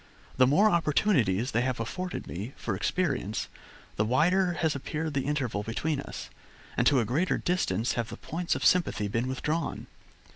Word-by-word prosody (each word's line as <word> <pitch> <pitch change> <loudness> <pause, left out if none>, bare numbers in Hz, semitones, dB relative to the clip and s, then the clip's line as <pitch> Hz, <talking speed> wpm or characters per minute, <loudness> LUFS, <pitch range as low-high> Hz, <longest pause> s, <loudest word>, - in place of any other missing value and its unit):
The 130 0 +6
more 185 +11 +5
opportunities 140 - +2
they 115 - +2
have 130 -1 -1
afforded 180 +11 -4
me 105 +9 -6
for 110 - -3
experience, 135 - -1 0.5
the 105 - +3
wider 175 - +3
has 160 -2 0
appeared 155 +3 -3
the 135 -1 -1
interval 135 -8 -1
between 135 +8 -2
us, - - -7 0.4
and - - +3
to 140 - +5
a - - -1
greater 155 - +1
distance 120 - 0
have 115 -2 -2
the - - -7
points 170 +2 -2
of - - -2
sympathy 170 - +3
been 115 +5 -1
withdrawn. 150 +5 -2
140 Hz, 170 wpm, -28 LUFS, 115-170 Hz, 0.5 s, The